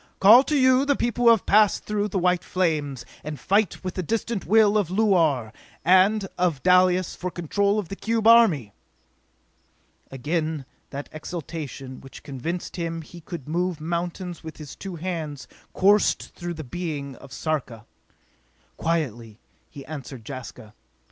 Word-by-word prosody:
Call 220 Hz, +6 st, +9 dB
to 300 Hz, -, +1 dB
you 260 Hz, 0 st, +5 dB
the 285 Hz, 0 st, +2 dB
people 240 Hz, 0 st, -1 dB
who -, -, +9 dB
have 225 Hz, -3 st, +4 dB
passed 210 Hz, 0 st, +4 dB
through 210 Hz, -1 st, -1 dB
the 200 Hz, -, -3 dB
white 180 Hz, -1 st, +2 dB
flames, 150 Hz, -8 st, -1 dB, 0.2 s
and 150 Hz, -2 st, -6 dB
fight 200 Hz, -, +1 dB
with 185 Hz, -1 st, -3 dB
the 185 Hz, -, -3 dB
distant 225 Hz, +3 st, -2 dB
will 215 Hz, -1 st, +5 dB
of 205 Hz, -6 st, +1 dB
Luar 165 Hz, -, +2 dB, 0.3 s
and 195 Hz, +3 st, +4 dB
of 170 Hz, -6 st, 0 dB
Dalis 180 Hz, 0 st, +4 dB
for 180 Hz, -, -4 dB
control 200 Hz, +5 st, 0 dB
of 205 Hz, -6 st, -3 dB
the 195 Hz, -, -5 dB
cube 225 Hz, +2 st, -1 dB
army!" 210 Hz, -, +5 dB, 1.4 s
Again 155 Hz, +2 st, -2 dB, 0.2 s
that 140 Hz, +1 st, -6 dB
exaltation, 155 Hz, -4 st, -7 dB
which 135 Hz, -, -12 dB
convinced 160 Hz, +8 st, -5 dB
him 165 Hz, -1 st, -3 dB
he 170 Hz, +3 st, -13 dB
could 165 Hz, -4 st, -8 dB
move 175 Hz, +1 st, -1 dB
mountains 175 Hz, +2 st, -4 dB
with 160 Hz, -1 st, -9 dB
his 150 Hz, -3 st, -9 dB
two 195 Hz, -3 st, -7 dB
hands, 160 Hz, -5 st, -5 dB, 0.2 s
coursed 205 Hz, +2 st, +2 dB
through 175 Hz, -1 st, -5 dB
the 155 Hz, -, -6 dB
being 145 Hz, -2 st, -5 dB
of 140 Hz, -, -14 dB
Sarka. 125 Hz, -4 st, -3 dB, 0.9 s
Quietly 120 Hz, -10 st, -2 dB, 0.3 s
be 140 Hz, -, -10 dB
answered 135 Hz, -6 st, -8 dB
Jaska. 125 Hz, -5 st, -9 dB
170 Hz, 150 wpm, -24 LUFS, 145-195 Hz, 1.4 s, Call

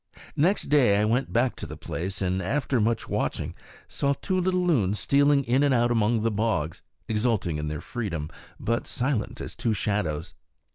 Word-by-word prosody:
Next 180 Hz, +8 st, +2 dB
day 125 Hz, -9 st, +4 dB
I 105 Hz, -, +3 dB
went 120 Hz, +5 st, 0 dB
back 120 Hz, +2 st, +2 dB
to -, -, -6 dB
the -, -, -8 dB
place, 95 Hz, +3 st, -4 dB
and, 95 Hz, 0 st, 0 dB
after 130 Hz, +4 st, 0 dB
much 115 Hz, +1 st, 0 dB
watching, -, -, -2 dB, 0.3 s
saw 140 Hz, 0 st, 0 dB
two 185 Hz, +6 st, -1 dB
little 180 Hz, 0 st, +1 dB
loons 105 Hz, -, +2 dB
stealing 140 Hz, +4 st, +3 dB
in 125 Hz, +3 st, +2 dB
and 140 Hz, -2 st, +3 dB
out 120 Hz, 0 st, +3 dB
among 115 Hz, 0 st, +2 dB
the 115 Hz, +1 st, +1 dB
bogs, 105 Hz, -7 st, -1 dB, 0.3 s
exulting 105 Hz, -7 st, 0 dB
in 75 Hz, -, -3 dB
their 75 Hz, -1 st, -4 dB
freedom, 85 Hz, -, -4 dB, 0.3 s
but 115 Hz, +1 st, -1 dB
silent 130 Hz, -2 st, -1 dB
as -, -, -7 dB
two 110 Hz, -2 st, 0 dB
shadows. 90 Hz, -7 st, -2 dB
115 Hz, 180 wpm, -26 LUFS, 100-135 Hz, 0.3 s, day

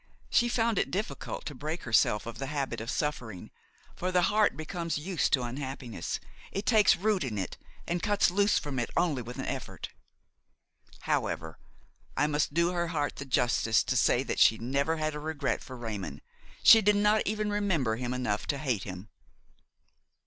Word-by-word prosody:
She 240 Hz, -, +4 dB
found 230 Hz, -3 st, +1 dB
it -, -, 0 dB
difficult 210 Hz, +5 st, -4 dB
to 145 Hz, -, -4 dB
break 155 Hz, +6 st, -5 dB
herself 105 Hz, -3 st, +2 dB
of 115 Hz, -, -7 dB
the 135 Hz, -, -3 dB
habit 135 Hz, -5 st, -3 dB
of 115 Hz, -, -6 dB
suffering, 120 Hz, -, -3 dB, 0.4 s
for 185 Hz, +1 st, -2 dB
the 180 Hz, -1 st, +3 dB
heart 215 Hz, -1 st, +3 dB
becomes 165 Hz, +1 st, -3 dB
used 165 Hz, 0 st, -1 dB
to 130 Hz, -, +3 dB
unhappiness, 130 Hz, -1 st, -4 dB, 0.3 s
it 200 Hz, +2 st, -3 dB
takes 215 Hz, -5 st, +5 dB
root 200 Hz, 0 st, +1 dB
in 115 Hz, -6 st, -3 dB
it 95 Hz, -3 st, -4 dB, 0.3 s
and 175 Hz, 0 st, -1 dB
cuts 205 Hz, -4 st, +2 dB
loose 200 Hz, +2 st, +3 dB
from 140 Hz, -4 st, -3 dB
it 120 Hz, -, -2 dB
only 165 Hz, -7 st, +1 dB
with 120 Hz, +1 st, -8 dB
an -, -, -4 dB
effort. -, -, -5 dB, 1.1 s
However, -, -, -2 dB, 0.6 s
I 150 Hz, -, +3 dB
must 150 Hz, 0 st, 0 dB
do 170 Hz, +1 st, +3 dB
her 175 Hz, -1 st, -1 dB
heart 150 Hz, -4 st, -2 dB
the 140 Hz, -, -5 dB
justice 120 Hz, -3 st, +2 dB
to -, -, -1 dB
say -, -, +3 dB
that -, -, -3 dB
she 110 Hz, -, +6 dB
never 140 Hz, +7 st, 0 dB
had 155 Hz, 0 st, -1 dB
a 150 Hz, -, -5 dB
regret 150 Hz, -2 st, -2 dB
for 130 Hz, -, -9 dB
Raymon; 110 Hz, -5 st, -5 dB, 0.4 s
she 225 Hz, -, +9 dB
did 210 Hz, 0 st, +4 dB
not 210 Hz, +1 st, +3 dB
even 215 Hz, 0 st, -1 dB
remember 170 Hz, -, 0 dB
him 125 Hz, 0 st, -3 dB
enough 125 Hz, -5 st, -2 dB
to 140 Hz, -, 0 dB
hate 130 Hz, -8 st, -1 dB
him. 95 Hz, +1 st, -7 dB
150 Hz, 180 wpm, -29 LUFS, 125-185 Hz, 1.1 s, she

